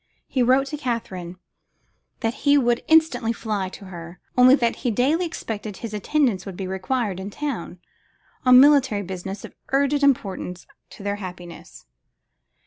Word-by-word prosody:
He 260 - -1
wrote 260 +3 +4
to 300 - -4
Katherine 190 - -4 0.8
that 225 -1 0
he 285 0 +5
would 240 -3 +2
instantly 315 -8 +3
fly 210 -5 -3
to 195 - -11
her, 175 -1 -10 0.2
only 255 +1 +7
that 235 -4 0
he 245 - -1
daily 285 - +1
expected 215 - -6
his 230 -2 -7
attendance 215 -2 +1
would 190 -3 -8
be 195 - -4
required 190 +2 -2
in 190 +1 -5
town, 230 -8 -5 0.7
on 255 0 +8
military 270 -7 +5
business 190 +1 -6
of - - -12 0.2
urgent 280 +1 +2
importance 195 -9 0 0.2
to - - -12
their 200 0 -2
happiness. 180 -3 -10
225 Hz, 150 wpm, -23 LUFS, 190-265 Hz, 0.8 s, on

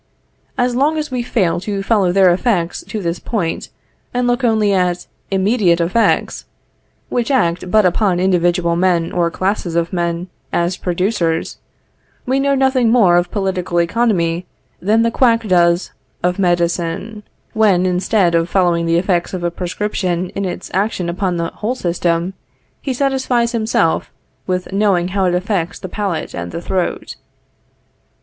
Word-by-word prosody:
As 245 0 +1
long 295 +5 +2
as 300 -2 -3
we 250 -1 -1
fail 195 -9 0
to 195 +1 -3
follow 195 -4 +2
their 190 -1 +5
effects 180 -3 -1
to 215 -3 -5
this 170 0 -2
point, 185 -8 -3 0.5
and 250 0 +1
look 245 +1 0
only 220 -3 +2
at 180 -2 0 0.2
immediate 195 -2 +2
effects, 185 +7 +1 0.6
which 240 -2 -1
act 180 -9 +1
but 215 +1 +4
upon 180 0 +2
individual 175 -2 +2
men 175 -2 +1
or 170 -1 +1
classes 185 -1 -2
of 170 +1 0
men 170 0 -2 0.2
as 175 +2 0
producers, 180 -2 -1 0.7
we 260 +2 +1
know 280 0 +2
nothing 265 -3 +2
more 215 -7 +5
of 175 0 +2
political 185 -3 -1
economy 175 -3 0 0.3
than 220 +4 +3
the 230 - +1
quack 230 -3 +2
does 175 -1 +2 0.3
of 180 +2 0
medicine, 175 +3 -1 0.3
when, 200 -5 +3
instead 180 0 +1
of 165 +1 +1
following 175 -3 +2
the 165 0 +3
effects 180 0 0
of 180 - -5
a 175 - 0
prescription 180 0 -2
in 200 - -3
its 180 - -5
action 190 -2 -1
upon 180 0 -1
the 165 0 -2
whole 230 +4 -2
system, 175 -2 -1 0.5
he 275 - -3
satisfies 260 -3 0
himself 220 -8 0 0.4
with 180 0 -2
knowing 195 -3 +2
how 195 0 0
it 180 -1 +2
affects 180 -2 -1
the - - -7
palate 185 -4 -3
and 85 0 -5
the - - -4
throat. 180 +1 -3
185 Hz, 155 wpm, -17 LUFS, 175-220 Hz, 0.7 s, their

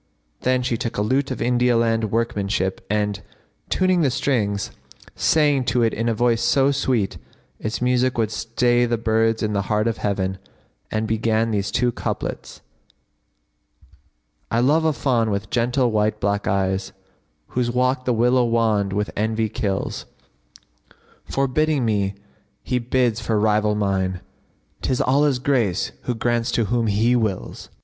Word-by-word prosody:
"[FN#58] - - -25
Then 130 0 +2
she 120 -2 -1
took 115 - -4
a - - +1
lute 130 +6 +1
of 130 - -3
India 125 0 +2
land 115 -1 +1
workmanship 100 -4 -1
and, 105 -1 -1 0.5
tuning 185 -1 +2
the 145 - +3
strings, 105 -7 -1 0.4
sang 145 -4 +3
to 120 0 +1
it 115 - +2
in 115 +2 -1
a - - +1
voice 120 0 +2
so 135 +3 +3
sweet 130 -7 0 0.4
its 110 +3 -3
music 125 0 +1
would 110 -2 0
stay 120 +2 +1
the 120 0 0
birds 115 0 +1
in 105 -1 -1
the 100 - +1
heart 105 +1 +1
of 115 - -1
heaven; 95 -2 -2 0.5
and 110 0 -1
began 110 +1 +1
these 100 -1 -1
two 120 +3 +1
couplets, - - -5 1.9
"I 115 - +1
love 150 +6 +3
a 160 - +4
fawn 120 -6 +1
with 100 0 -3
gentle 125 +1 +1
white 105 0 +1
black 100 0 -1
eyes, 95 -1 -1 0.3
* - - -45
Whose 125 -1 -1
walk 125 +1 0
the 125 - +1
willow 125 +2 +3
wand 110 -4 +1
with 105 +1 -1
envy 110 +1 0
kills: 100 -2 -3 1.2
Forbidding 135 0 0
me 100 -3 0 0.5
he 125 - -1
bids 120 -1 +1
for 110 -2 0
rival 105 0 +2
mine, 95 -3 -1 0.3
* - - -41
'Tis 130 - 0
Allah's 140 +1 +3
grace 120 -8 0
who 125 - -1
grants 120 +1 0
to 115 - +2
whom 115 +1 0
He 110 +4 +2
wills!" 110 -6 -2
115 Hz, 155 wpm, -22 LUFS, 105-125 Hz, 1.9 s, a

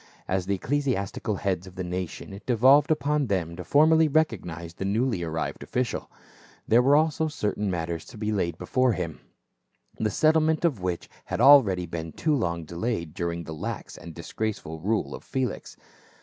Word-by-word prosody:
As 95 -1 -1
the 100 - +1
ecclesiastical 115 -4 -1
heads 95 -2 -2
of 90 - -12
the 95 - -4
nation 90 +2 -5
it 100 +2 -11
devolved 130 +4 +5
upon 150 -2 +1
them 85 -5 -1
to 90 - -7
formally 160 - +5
recognize 90 - -1
the 90 - -6
newly 110 +1 0
arrived 80 -1 -3
official; 125 -1 -2 0.6
there 115 +2 +5
were 140 +3 +5
also 160 +1 +2
certain 105 -8 -2
matters 85 -2 -3
to - - -12
be 105 0 -2
laid 85 -5 -1
before 130 +3 +1
him, 85 -5 -4 0.8
the 110 - +1
settlement 155 - +3
of 135 - +1
which 90 -2 -3 0.2
had - - -3
already 110 -11 +6
been 80 -1 -6
too 155 - 0
long 85 - -1
delayed 85 -1 -3
during 85 0 -3
the 80 - -7
lax 75 - -5
and 85 -2 -10
disgraceful 85 -2 -4
rule 105 +7 -1
of - - -8
Felix. 130 -2 -3
100 Hz, 170 wpm, -26 LUFS, 85-135 Hz, 0.8 s, already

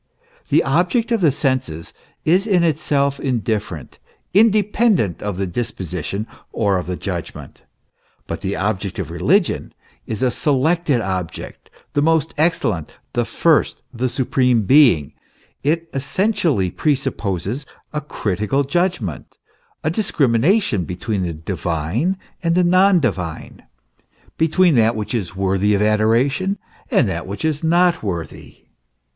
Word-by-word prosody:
"* - - -33
The - - +4
object 180 - +1
of 230 -3 +2
the 160 -5 +5
senses 130 - -2 0.3
is 185 +7 +3
in 185 -5 +3
itself 140 -3 +1
indifferent 110 - -3 0.3
independent 210 - +3
of 100 -3 -3
the 95 - -1
disposition 95 -1 -4 0.3
or 100 -4 +1
of 90 - -6
the 90 - -2
judgment; 90 -3 -6 0.6
but 85 -1 -5
the 95 +2 -2
object 100 -2 -2
of 85 -5 -4
religion 175 - +1 0.3
is 110 +3 -3
a 125 - +3
selected 145 +1 +1
object; 90 -5 -5 0.2
the 145 - +2
most 160 0 +2
excellent, 155 - 0 0.2
the - - 0
first, - - +1
the 125 +2 -1
supreme 125 -2 +1
being; 95 - +5 0.5
it 165 +4 0
essentially 150 - 0
pre 150 -2 +1
supposes 120 - -3 0.3
a 150 - -2
critical 110 0 -1
judgment, 145 - -2 0.5
a 155 - +1
discrimination 145 - +2
between 95 +4 -3
the 85 -2 -2
divine 85 - -2 0.2
and 170 -1 +1
the 180 - +4
non 185 +1 +5
divine, 95 - -3 0.8
between 165 +2 +4
that 115 -2 +3
which 110 +1 -4
is 100 -5 -3
worthy 95 +2 +1
of 100 - 0
adoration 115 - +2 0.3
and 125 - +3
that 85 -2 -4
which 100 +11 -4
is 155 0 -1
not 175 +1 +3
worthy. 85 -7 -6
125 Hz, 130 wpm, -20 LUFS, -, 0.8 s, the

